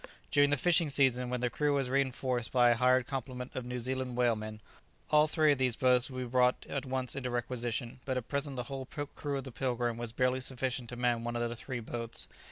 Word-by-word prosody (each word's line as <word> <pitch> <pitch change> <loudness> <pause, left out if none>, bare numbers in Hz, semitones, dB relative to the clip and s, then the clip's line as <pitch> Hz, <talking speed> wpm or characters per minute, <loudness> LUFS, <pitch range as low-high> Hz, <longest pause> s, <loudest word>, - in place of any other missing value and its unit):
During 145 0 +5
the 145 - +2
fishing 170 +1 +3
season, 130 -3 +2
when 125 -1 -2
the 125 -1 0
crew 145 +3 +1
was 135 -2 +1
reinforced 130 -2 0
by 120 -2 +5
a - - +4
hired 125 +1 +4
complement 125 -1 -5
of 125 -1 -4
New 125 0 -3
Zealand 130 0 -3
whalemen, 110 -3 0 0.5
all 150 0 +6
three 155 -1 +4
of 140 - +1
these 125 -3 +2
boats 125 0 +3
would 130 - -7
be 125 - -2
brought 125 +1 +2
at 135 -1 -3
once 130 -1 -1
into 130 -2 -3
requisition, 120 0 -2
but 130 -1 -1
at 125 - -4
present 140 -1 -2
the 125 - -2
whole 135 +1 -6
crew 145 0 -4
of 135 - -4
the 130 - -8
"Pilgrim" 120 -2 -1
was 120 -1 -4
barely 125 +1 +1
sufficient 130 -2 -2
to 125 - -5
man 120 -1 +1
one 120 0 -3
of 120 0 0
the 120 - -5
three 120 +1 -5
boats. 115 +1 -4
125 Hz, 230 wpm, -32 LUFS, 120-135 Hz, 0.5 s, all